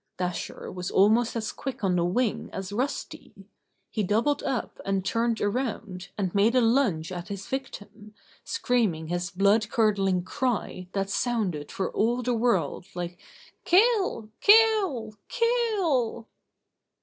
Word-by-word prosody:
Dasher 180 -1 -4
was 180 -1 -5
almost 220 +5 +3
as 220 -2 -2
quick 265 -4 -6
on 185 -2 +2
the 175 - +2
wing 215 +6 0
as 195 +1 -5
Rusty. 260 +6 -4 0.6
He 220 - -1
doubled 225 +9 +1
up 265 -4 -3
and 195 -1 -1
turned 230 +1 0
around, 205 -4 -3
and 190 -4 -1
made 210 +5 +3
a - - +6
lunge 225 - +2
at 175 -1 -6
his 200 -1 -6
victim, 215 -5 -7 0.3
screaming 200 -11 0
his 175 +1 -2
blood 200 +3 +2
curdling 200 -6 +2
cry 235 -6 -2
that 195 0 -1
sounded 195 -12 -1
for 190 - -2
all 240 +3 +1
the 245 +1 0
world 235 -5 0
like: 175 0 -5 0.4
"Kill! 380 - +3
Kill! 405 - +4
Kill!" 405 - 0
220 Hz, 135 wpm, -27 LUFS, 190-250 Hz, 0.6 s, a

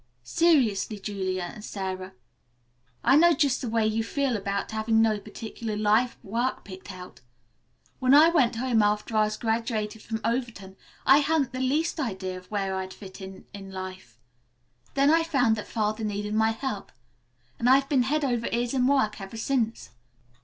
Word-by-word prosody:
"Seriously, 255 - +2
Julia 185 -3 -3
and 215 - -11
Sara, 190 -2 -5 0.9
I - - +5
know 340 +3 +6
just 280 -5 +1
the 245 - -3
way 225 -1 +1
you 220 +1 0
feel 270 +1 -1
about 200 0 -3
having 220 +1 +1
no 220 -2 +3
particular 220 +1 -6
life 215 +4 +2
work 235 +6 -2
picked 190 0 -9
out. 180 -4 -11 0.8
When 260 +1 +5
I 310 +3 +8
went 265 -9 +2
home 235 -1 +2
after 210 +2 0
I 215 0 +4
was 215 0 -3
graduated 220 -1 -2
from 220 0 -4
Overton 230 -5 -3 0.3
I 270 +2 +7
hadn't 295 -3 +1
the 255 - -5
least 300 +6 0
idea 190 -8 -3
of 180 - -20
where 195 -2 -2
I'd 190 0 -5
fit 195 -1 -11
in 190 0 -10
in 195 -1 -9
life. 185 -10 -8 0.8
Then 280 +1 +4
I 330 +1 +5
found 270 -9 +2
that 210 - -6
Father 215 0 -1
needed 210 0 -3
my 220 +1 +3
help, 225 -2 -4 0.7
and 240 - +2
I've 270 +1 +5
been 275 -3 +3
head 290 +4 0
over 240 -3 -1
ears 240 +1 -1
in 255 -1 +2
work 240 -7 +1
ever 195 +3 -8
since. 230 -1 -1
225 Hz, 175 wpm, -26 LUFS, 205-260 Hz, 0.9 s, I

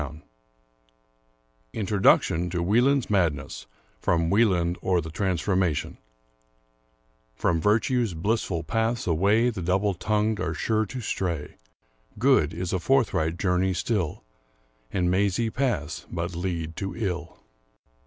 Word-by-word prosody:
221 - - -15
Introduction 95 -4 +3
to 85 0 -2
"Wieland's 125 +8 +3
Madness,'* 85 -9 -1 0.3
from 85 +4 +1
*^Wie 110 +3 +5
land, 85 -1 0
or 90 -2 +2
The 80 -1 -6
Transformation 90 -2 -1 1.4
From 85 +5 0
Virtue's 115 - +1
blissful 95 -1 -1
paths 115 +7 -1
away 100 +8 +3
The 100 -5 -6
double 95 +4 +1
tongued 105 +3 0
are 85 -3 -2
sure 110 +6 0
to 125 +5 -6
stray; 85 -8 -3 0.6
Good 115 - +3
is 90 +1 -4
a 95 - +1
forth 130 +6 +2
right 80 +2 0
journey 90 0 +1
still, 95 -6 -2 0.7
And 90 -2 +1
mazy 100 +4 +1
paths 105 - -2
but 85 +2 -3
lead 85 -2 -3
to 95 -2 -4
ill. 90 -6 -4
90 Hz, 125 wpm, -26 LUFS, 80-105 Hz, 1.4 s, ^Wie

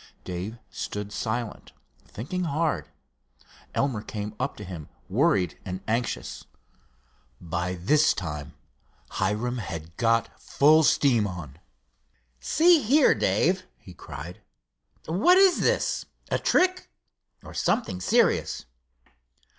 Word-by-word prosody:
Dave 95 +5 -5
stood 105 0 -5
silent, 115 +1 -4 0.3
thinking 180 - -4
hard. 150 - -1 0.9
Elmer 130 -7 0
came 105 -1 -5
up - - -2
to 105 - -7
him, 90 -6 -8 0.2
worried 90 -4 +1
and 95 -1 -5
anxious. 115 +2 -2 1.0
By 90 +1 -3
this 150 - +3
time 75 -6 -5 0.6
Hiram 110 +6 -1
had 85 -5 -7
got 115 -1 +1
full 155 +3 +5
steam 125 -8 +3
of 95 - -5
excitement 75 -5 -9
on. - - -28 0.8
"See 330 - +4
here, 275 +5 +5
Dave," 185 +2 +1
he 90 - -14
cried, 80 +2 -9 0.6
"what 210 - +4
is 385 -2 +5
this—a - - -1
trick, 365 0 +2 0.5
or - - -11
something 95 - 0
serious?" - - +2
110 Hz, 110 wpm, -26 LUFS, -, 1.0 s, full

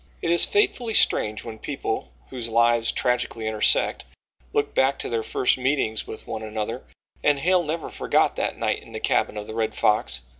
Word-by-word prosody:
It 165 - +1
is 170 - +6
fatefully 250 - +1
strange 105 0 +3
when 110 -2 -8
people, 65 - -4 0.2
whose 120 -2 -4
lives 115 0 +3
tragically 125 -2 -1
intersect, 110 -1 +1 0.5
look 145 0 0
back 135 +1 +2
to - - -4
their 115 -1 0
first 125 +3 +1
meetings 130 -5 0
with 110 - -8
one 110 - -5
another, 110 -1 -4 0.4
and 145 -1 +4
Hale 180 +5 +3
never 160 0 -3
forgot - - +1
that - - -2
night - - -1
in - - -15
the - - -4
cabin 105 - 0
of 105 - -5
the 110 - -8
Red 110 -1 -1
Fox. 105 0 +1
120 Hz, 185 wpm, -24 LUFS, 110-145 Hz, 0.5 s, is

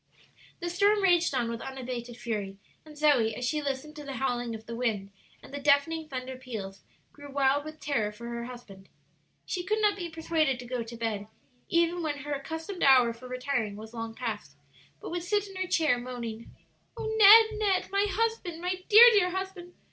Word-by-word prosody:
The 345 - -2
storm 405 +3 +3
raged 350 -3 +4
on 240 -2 0
with 230 0 -5
unabated 250 -3 -6
fury, 205 -5 -4 0.3
and 305 -1 -14
Zoe, 270 -8 +3
as 250 - -4
she 300 +3 -1
listened 285 +2 -4
to 295 - -7
the 275 -2 -6
howling 245 -2 -2
of 220 0 -10
the 230 - -6
wind 215 -5 -2 0.3
and - - -14
the 285 - -4
deafening 295 +3 +2
thunder 255 0 -5
peals, 210 -7 -7 0.3
grew 285 -1 -12
wild 275 +1 +2
with 310 0 -9
terror 245 -8 -1
for 235 +3 -10
her 235 0 -5
husband. 210 -6 -12 0.6
She 360 - -3
could 430 +4 0
not 415 -1 +3
be 350 -3 -5
persuaded 320 -4 0
to 245 - -9
go 245 0 -3
to 230 +1 -8
bed, 215 -3 -3 0.4
even 340 +1 +2
when 300 -3 -2
her 295 0 -3
accustomed 320 +6 -6
hour 255 -4 +6
for 240 +2 -12
retiring 250 -4 -2
was 220 +2 -10
long 225 -1 -6
past, 210 - -5 0.4
but - - -8
would 350 0 -2
sit 410 +3 0
in 390 - -12
her 375 0 -2
chair, 315 -8 +2
moaning, 235 -2 -7 0.5
"O 460 - -5
Ned! 440 0 +7
Ned! 390 -4 +1
my 400 +1 +2
husband, 445 -6 -1
my 365 +1 -3
dear, 440 +2 +10
dear 405 -5 +3
husband! 375 -1 -6
280 Hz, 195 wpm, -28 LUFS, 235-350 Hz, 0.6 s, dear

